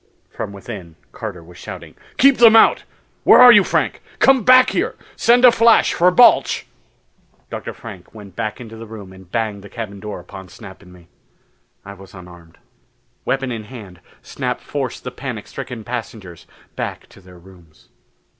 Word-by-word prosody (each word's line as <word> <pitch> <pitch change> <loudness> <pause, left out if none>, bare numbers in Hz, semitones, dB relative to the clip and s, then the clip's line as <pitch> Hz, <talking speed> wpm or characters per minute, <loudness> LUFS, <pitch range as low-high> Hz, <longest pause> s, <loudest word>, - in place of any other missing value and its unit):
From - - -6
within, 100 -4 -10 0.2
Carter 100 -7 -8
was 90 +1 -16
shouting, - - -10 0.2
"Keep 275 0 +5
them 230 -2 +7
out! 225 - +4 0.4
Where - - +6
are 250 0 +10
you, 205 -4 +6
Frank? - - -2 0.2
Come 265 -3 +3
back 255 +2 +6
here! - - -2 0.2
Send 245 +2 +4
a 245 - +8
flash 230 0 +3
for 180 +2 +3
Balch!" 240 +7 +4 0.9
Dr. - - -6
Frank 100 -6 -12
went 100 -4 -14
back 110 -2 -4
into 115 -2 -11
the 115 0 -10
room 105 -4 -11
and 95 -1 -17
banged 110 -4 -3
the 100 - -12
cabin 100 -2 -8
door 105 +1 -7
upon 95 -2 -12
Snap 95 +4 -13
and 90 -2 -17
me. 90 -2 -18 0.8
I 100 - -9
was 95 -1 -15
unarmed. 85 -2 -15 0.7
Weapon 135 -1 -2
in 110 -2 -6
hand, 105 -7 -12 0.2
Snap - - -4
forced - - -5
the - - -6
panic - - -7
stricken 120 -3 -8
passengers 110 -7 -8 0.3
back - - -6
to - - -18
their 90 -1 -17
rooms. 85 -3 -20
105 Hz, 170 wpm, -18 LUFS, 95-125 Hz, 0.9 s, are